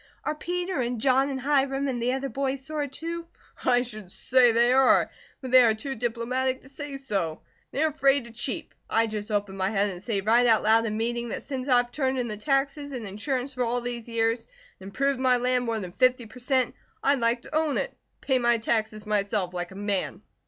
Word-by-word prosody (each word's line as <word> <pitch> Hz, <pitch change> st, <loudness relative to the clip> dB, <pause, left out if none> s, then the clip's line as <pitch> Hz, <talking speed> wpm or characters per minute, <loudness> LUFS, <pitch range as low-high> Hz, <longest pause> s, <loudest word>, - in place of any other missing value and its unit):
Are 305 Hz, -, -1 dB
Peter, 355 Hz, 0 st, -2 dB
and 240 Hz, -1 st, -2 dB
John, 265 Hz, +3 st, +3 dB
and 270 Hz, -1 st, -3 dB
Hiram, 275 Hz, 0 st, +1 dB
and 245 Hz, -3 st, -2 dB
the 245 Hz, +2 st, +1 dB
other 270 Hz, +1 st, -2 dB
boys 270 Hz, 0 st, -3 dB
sore, 300 Hz, -1 st, -2 dB
too?" 335 Hz, +5 st, -6 dB, 0.4 s
"I 245 Hz, -1 st, +3 dB
should 215 Hz, -6 st, -9 dB
say 245 Hz, +5 st, +4 dB
they 235 Hz, +2 st, +4 dB
are! 265 Hz, -1 st, +4 dB, 0.3 s
But 260 Hz, -2 st, -6 dB
they 255 Hz, 0 st, +9 dB
are 225 Hz, -3 st, +4 dB
too 270 Hz, +5 st, -4 dB
diplomatic 250 Hz, +2 st, -1 dB
to 270 Hz, -, -12 dB
say 285 Hz, 0 st, -6 dB
so. 195 Hz, -12 st, -3 dB, 0.3 s
They 285 Hz, -, -1 dB
are 315 Hz, -, +3 dB
afraid 275 Hz, -3 st, +2 dB
to 235 Hz, -, -11 dB
cheep. 255 Hz, +7 st, -4 dB, 0.2 s
I 225 Hz, 0 st, +3 dB
just 215 Hz, -1 st, -5 dB
open 205 Hz, -2 st, -1 dB
my 190 Hz, 0 st, +1 dB
head 205 Hz, -1 st, +1 dB
and 180 Hz, -1 st, -8 dB
say 210 Hz, -2 st, -1 dB
right 235 Hz, +4 st, +4 dB
out 225 Hz, -2 st, +4 dB
loud 225 Hz, +1 st, +4 dB
in 215 Hz, 0 st, -2 dB
meeting 235 Hz, +1 st, -2 dB
that -, -, -5 dB
since 265 Hz, -2 st, -5 dB
I've 245 Hz, -2 st, +3 dB
turned 265 Hz, -1 st, 0 dB
in 245 Hz, -1 st, -1 dB
the 215 Hz, -, -4 dB
taxes 275 Hz, +4 st, -1 dB
and 240 Hz, -4 st, -5 dB
insurance 255 Hz, +7 st, -3 dB
for 250 Hz, -1 st, -1 dB
all 240 Hz, +1 st, 0 dB
these 240 Hz, -1 st, -5 dB
years 230 Hz, 0 st, 0 dB, 0.3 s
and 190 Hz, -, -10 dB
improved 275 Hz, +6 st, 0 dB
my 255 Hz, -1 st, +4 dB
land 250 Hz, 0 st, +1 dB
more 230 Hz, -1 st, -1 dB
than 185 Hz, -4 st, -6 dB
fifty 255 Hz, +3 st, +2 dB
per 225 Hz, +3 st, -13 dB
cent., 255 Hz, -1 st, +1 dB, 0.3 s
I'd 280 Hz, -1 st, +3 dB
like 235 Hz, +1 st, +1 dB
to -, -, -8 dB
own 310 Hz, -2 st, +1 dB
it, -, -, -1 dB
and -, -, -38 dB
pay 265 Hz, -2 st, +2 dB
my 240 Hz, -1 st, +3 dB
taxes 220 Hz, -1 st, -1 dB
myself, 205 Hz, -3 st, 0 dB
like 175 Hz, -1 st, -3 dB
a 190 Hz, -, -12 dB
man." 200 Hz, -1 st, -2 dB
245 Hz, 225 wpm, -26 LUFS, 220-270 Hz, 0.4 s, they